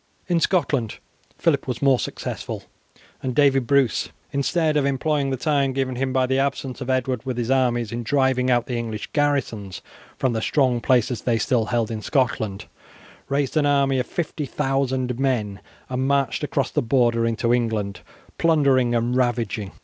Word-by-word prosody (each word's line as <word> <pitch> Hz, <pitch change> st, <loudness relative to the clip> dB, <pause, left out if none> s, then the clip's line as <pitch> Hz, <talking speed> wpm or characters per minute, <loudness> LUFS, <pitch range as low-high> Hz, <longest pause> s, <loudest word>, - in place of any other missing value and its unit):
In 175 Hz, -2 st, +2 dB
Scotland 145 Hz, -, 0 dB, 0.4 s
Phillip 145 Hz, -5 st, +1 dB
was 125 Hz, -3 st, -3 dB
more 135 Hz, -3 st, +3 dB
successful, -, -, -5 dB, 0.6 s
and 130 Hz, -2 st, -3 dB
David 135 Hz, -4 st, +3 dB
Bruce, 140 Hz, -4 st, +2 dB, 0.2 s
instead 155 Hz, +3 st, +1 dB
of 145 Hz, -, +3 dB
employing 140 Hz, +1 st, 0 dB
the 135 Hz, -, -1 dB
time 140 Hz, -1 st, +1 dB
given 130 Hz, -1 st, -1 dB
him 130 Hz, +1 st, -1 dB
by 130 Hz, 0 st, +2 dB
the 130 Hz, +1 st, +1 dB
absence 135 Hz, -1 st, -2 dB
of 130 Hz, -, -5 dB
Edward 130 Hz, -2 st, 0 dB
with 130 Hz, -2 st, -4 dB
his 120 Hz, +1 st, -1 dB
armies 120 Hz, -4 st, +1 dB
in 120 Hz, +1 st, -3 dB
driving 130 Hz, 0 st, +1 dB
out 120 Hz, -1 st, +2 dB
the 125 Hz, -, -3 dB
English 110 Hz, -2 st, -5 dB
garrisons 130 Hz, -10 st, -1 dB, 0.3 s
from 130 Hz, -2 st, 0 dB
the 110 Hz, -, -1 dB
strong 125 Hz, -2 st, +1 dB
places 125 Hz, -2 st, +2 dB
they 120 Hz, -2 st, +1 dB
still 115 Hz, +1 st, +1 dB
held 115 Hz, 0 st, -1 dB
in 110 Hz, -1 st, -4 dB
Scotland, 110 Hz, -6 st, -1 dB, 0.6 s
raised 140 Hz, 0 st, 0 dB
an 150 Hz, -2 st, +3 dB
army 140 Hz, -2 st, +2 dB
of 125 Hz, -, -2 dB
50,000 135 Hz, -5 st, -2 dB
men 110 Hz, -8 st, 0 dB, 0.3 s
and 130 Hz, +1 st, -1 dB
marched 140 Hz, +1 st, +1 dB
across 140 Hz, -2 st, -1 dB
the -, -, +1 dB
border 120 Hz, -1 st, +2 dB
into 115 Hz, +1 st, +1 dB
England 110 Hz, -5 st, -1 dB, 0.4 s
plundering 135 Hz, -7 st, +3 dB
and 120 Hz, +1 st, 0 dB
ravaging. 115 Hz, -5 st, -1 dB
130 Hz, 165 wpm, -23 LUFS, 120-140 Hz, 0.6 s, more